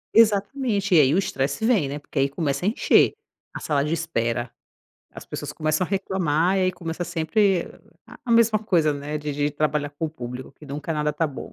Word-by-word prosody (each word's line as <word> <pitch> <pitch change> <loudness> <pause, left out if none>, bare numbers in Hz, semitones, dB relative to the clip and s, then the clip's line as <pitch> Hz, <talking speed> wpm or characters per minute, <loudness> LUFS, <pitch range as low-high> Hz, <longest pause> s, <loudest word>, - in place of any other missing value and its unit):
Exatamente. 210 -1 +3
E - - +8
aí 135 +2 +3
o - - +3
estresse 140 0 -1
vem, 200 - +2
né, 145 - -4
porque 145 0 -5
aí 135 +1 +2
começa 140 +1 -2
a - - +4
encher, 225 - +4 0.4
a - - -5
sala 145 -2 0
de 150 +2 -1
espera, 120 -8 -2 0.6
as - - -10
pessoas - - -6
começam 155 +3 0
a - - -15
reclamar, 185 -2 +1
e - - +2
aí 185 0 +2
começa 170 0 -5
sempre 175 +3 +1 0.6
a 235 - 0
mesma 230 -2 +5
coisa, 170 -8 +2
né, 145 +1 -4
de 150 -1 -4
de 145 +1 0
trabalhar 150 -1 -1
com 155 +3 -3
o - - -7
público, 125 -3 -7
que 150 - -15
nunca 145 +3 -4
nada 150 0 0
está 165 - -1
bom. 140 - -8
160 Hz, 210 wpm, -24 LUFS, 145-190 Hz, 0.6 s, E